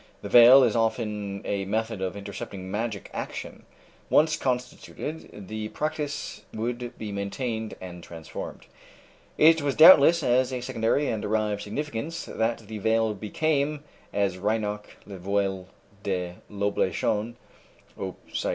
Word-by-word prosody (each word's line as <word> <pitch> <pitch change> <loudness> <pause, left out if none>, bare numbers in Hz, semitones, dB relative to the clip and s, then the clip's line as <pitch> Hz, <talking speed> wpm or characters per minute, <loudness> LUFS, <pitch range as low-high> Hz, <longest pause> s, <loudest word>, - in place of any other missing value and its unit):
The 100 - -5
veil 120 +4 +9
is 115 -4 +2
often 105 -3 -1
a 100 -1 -1
method 110 0 -2
of 95 +1 -3
intercepting 100 -1 -7
magic 105 -1 -3
action. - - -6 0.4
Once 155 0 +4
constituted, 125 -2 -4
the 110 +1 -4
practice 150 +2 -4
would 120 +2 -4
be 105 -2 -5
maintained 110 +3 -3
and 90 -2 -9
transformed." 80 -2 -8 0.7
It 160 +1 +6
was 140 -2 -1
doubtless 165 0 +8
as 130 +1 +2
a 125 -1 -3
secondary 120 +4 0
and 110 - -1
derived 105 -1 0
significance 150 +8 -4
that 115 +1 -1
the 110 0 -6
veil 110 +1 +2
became, 145 +7 -1 0.3
as 100 -2 0
Reinach 105 0 -1 0.2
("Le 100 -2 -9
Voile 95 0 -1 0.3
de 90 -3 -2 0.2
l'Oblation," 105 +2 -1 0.6
op. - - -5 0.2
cit. - - -1
110 Hz, 130 wpm, -26 LUFS, 100-130 Hz, 0.7 s, veil